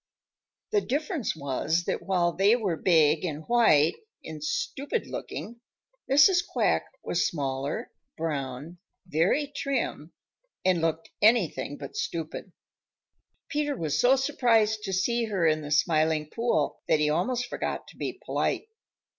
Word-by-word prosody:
The 420 -1 +3
difference 300 - -2
was 155 +4 -1
that - - -2
while 180 -3 +1
they 200 +6 +4
were 205 -8 -1
big 160 -2 +3
and 155 -3 -3
white 170 -11 +4 0.3
and 155 -2 -7
stupid 280 - -2
looking, 235 +1 -7 0.5
Mrs. 350 +7 +6
Quack - - 0 0.2
was 175 - +1
smaller, 140 - -3 0.3
brown, 150 +1 -4 0.3
very 185 - +1
trim, 250 - -2 0.5
and 185 -3 +3
looked 165 0 -2
anything 210 -9 +2
but 140 - -9
stupid. 165 +3 -4 1.0
Peter 295 -2 -1
was 155 -2 -1
so 255 +2 +5
surprised 230 -6 +2
to 195 - -3
see 235 +5 +1
her 195 -6 0
in 155 -1 +3
the 145 - -7
Smiling 155 0 +2
Pool 230 -11 0
that 155 - +3
he 150 - +2
almost 240 +10 0
forgot - - -4
to - - -15
be - - -3
polite. 440 - -1
175 Hz, 135 wpm, -27 LUFS, 155-240 Hz, 1.0 s, Mrs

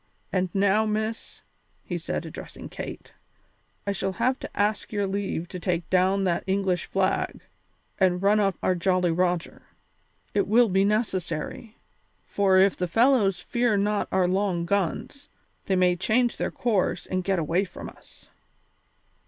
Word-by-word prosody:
And 185 -1 +1
now, 200 +2 +3
Miss," 215 +1 -3 0.4
he - - -4
said, - - -4
addressing - - -9
Kate, - - -8 0.7
"I 200 - 0
shall 195 0 -2
have 255 +8 0
to - - -7
ask 210 +1 0
your 205 -2 0
leave 190 -3 -3
to 180 - -6
take 175 -2 -1
down 190 +2 +3
that 175 -3 0
English 190 -2 0
flag 190 -1 -1 0.6
and 180 -2 +3
run 200 +3 +3
up 195 -3 +2
our 185 - +3
Jolly 180 0 +1
Roger. 175 0 -1 0.7
It 200 -1 +1
will 230 +2 +5
be 190 +1 +3
necessary, 205 -1 -2 0.5
for 195 -2 +2
if 195 +1 +5
the 180 - -2
fellows 215 -3 +3
fear 235 +1 +1
not 205 +1 0
our 185 -1 +2
long 185 -2 0
guns, 200 - -2 0.4
they 190 - +1
may 180 -1 +3
change 235 +7 +1
their - - -1
course 195 -6 0
and 185 0 -2
get 195 0 0
away 165 +3 +1
from 180 - -8
us." - - -15
195 Hz, 155 wpm, -26 LUFS, 180-210 Hz, 0.7 s, will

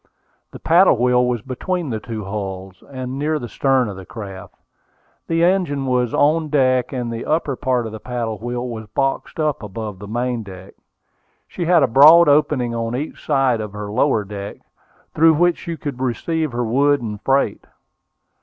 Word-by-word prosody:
The - - -10
paddle 175 -3 +4
wheel 125 +1 +3
was 120 -3 -2
between 160 +4 -3
the 110 - -2
two 110 0 -6
hulls, 95 -2 -6
and 130 0 -5
near 155 +2 0
the 120 -5 -6
stern 130 +2 +1
of 100 - -6
the 95 - -9
craft. 95 -3 -9 0.7
The 165 0 +1
engine 175 -7 +1
was 125 -2 0
on 155 +2 +2
deck, 130 -3 +2
and 120 -3 -3
the 115 - -5
upper 155 -3 -1
part 125 -2 -1
of 110 - -6
the 110 - -8
paddle 115 -3 -4
wheel 120 +1 -4
was 110 -3 -7
boxed 135 +8 -2
up 150 -2 0
above 105 -1 -6
the 100 - -9
main 120 +2 -2
deck. 95 -2 -11 0.7
She 175 - -4
had 170 -3 +4
a - - +4
broad 155 +7 +7
opening 145 -4 +2
on 115 0 -2
each 145 +5 -5
side 135 -6 +1
of 105 -2 -7
her 105 0 -6
lower 115 -1 +1
deck, 100 0 -7 0.6
through 160 0 +5
which 175 +2 +2
she 170 -1 -6
could 140 -5 -6
receive 155 +5 -1
her 120 0 -2
wood 140 +5 +2
and 105 -2 -5
freight. 135 -6 0
125 Hz, 180 wpm, -20 LUFS, 110-145 Hz, 0.7 s, broad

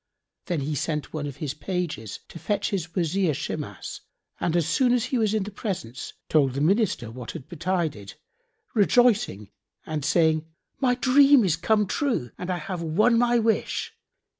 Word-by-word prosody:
Then 175 -6 -1
he 150 +3 -2
sent 150 +1 -2
one 150 -2 -3
of 140 - -6
his 140 -1 -4
pages 155 - -4
to 170 - -9
fetch 205 +3 -1
his 175 -4 -3
Wazir 175 -2 +1
Shimas - - -5 0.4
and 170 - 0
as 170 -3 +2
soon 245 +9 +3
as 245 -1 +2
he 255 -1 -1
was 220 -1 +2
in 215 - +1
the 205 - -7
presence 175 - -5
told 140 -5 +3
the - - -1
Minister 170 - +1
what 120 0 -7
had 155 -6 -8
betided, 170 - -2 0.6
rejoicing 210 - +3 0.3
and 155 -2 -3
saying, 160 0 +2 0.3
"My 250 -2 +3
dream 275 +1 +6
is 170 -4 +2
come 210 +5 +2
true 220 - -1
and 180 - -5
I 180 - 0
have 175 +1 -5
won 210 +9 +3
my 240 0 +3
wish. 225 -1 0
175 Hz, 170 wpm, -25 LUFS, 150-220 Hz, 0.6 s, dream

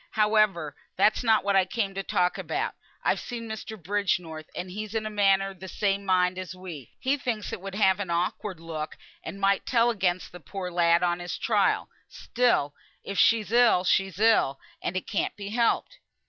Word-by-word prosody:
Howe'er, 210 -8 +2 0.2
that's 210 +5 +3
not 220 -2 +4
what 200 0 +1
I 190 - +6
came 195 +1 -2
to 195 - -3
talk 180 -2 0
about. - - -2 0.3
I've - - +2
seen 235 -2 -6
Mr. 220 0 -6
Bridgenorth, 175 -4 -2
and 180 +1 -5
he 210 +3 -4
is 215 - -10
in 220 -1 -1
a 215 - -3
manner 195 -1 +3
of 190 - -16
the 190 - -8
same 200 0 -1
mind 185 -1 +2
as 185 0 -6
me; 170 -9 -9
he 270 +2 +1
thinks 230 -6 -3
it - - -5
would 195 0 -6
have 195 -2 +3
an 200 -3 -4
awkward 175 +2 -2
look, 160 -2 -6 0.3
and 195 - -7
might 195 0 +2
tell 240 -1 +3
against 185 -4 -1
the 180 - -10
poor 180 +3 -6
lad 170 0 +3
on 175 0 +1
his 175 0 -5
trial; - - +1 0.2
still 235 -13 +1 0.3
if 200 -1 -3
she's 220 -2 +4
ill 235 -6 +5
she's 195 0 +1
ill, 215 -11 +3 0.2
and 185 - -2
it 185 - -4
can't 205 - -2
be 200 -1 -7
helped." 235 - 0
195 Hz, 200 wpm, -27 LUFS, 180-215 Hz, 0.3 s, I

